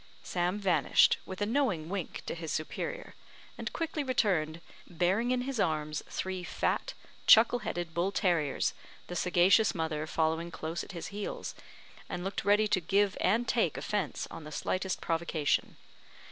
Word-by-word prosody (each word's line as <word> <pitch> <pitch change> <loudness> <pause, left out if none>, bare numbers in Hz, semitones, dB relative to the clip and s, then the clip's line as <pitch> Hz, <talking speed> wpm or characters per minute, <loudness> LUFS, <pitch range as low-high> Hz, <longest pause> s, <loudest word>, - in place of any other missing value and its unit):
Sam 180 +2 -1
vanished, 180 -8 +4
with 190 +2 -3
a - - +2
knowing 220 - 0
wink 185 -1 -4
to - - -3
his 165 -2 -5
superior, - - -4 0.4
and - - -5
quickly 325 -2 -2
returned, 180 - +1 0.3
bearing 185 +7 +1
in 250 0 +1
his 260 -2 -3
arms 155 -3 0
three 185 -1 -3
fat, - - -1 0.3
chuckle 230 +2 +7
headed 175 -6 -4
bull 175 +4 0
terriers, 170 -9 +1 0.3
the 175 - -7
sagacious 180 +5 +4
mother 160 -2 -2
following 160 +1 0
close 165 0 -4
at - - -10
his 170 - -5
heels, 205 +1 -5 0.6
and 175 - -4
looked 195 +1 -3
ready 210 +1 +4
to 190 -3 +1
give 195 +4 +2
and 230 +5 +2
take 235 - +1
offence 205 -7 -2
on 165 - -8
the 150 - -9
slightest 185 +4 -2
provocation. 165 -2 0
180 Hz, 155 wpm, -31 LUFS, 165-210 Hz, 0.6 s, chuckle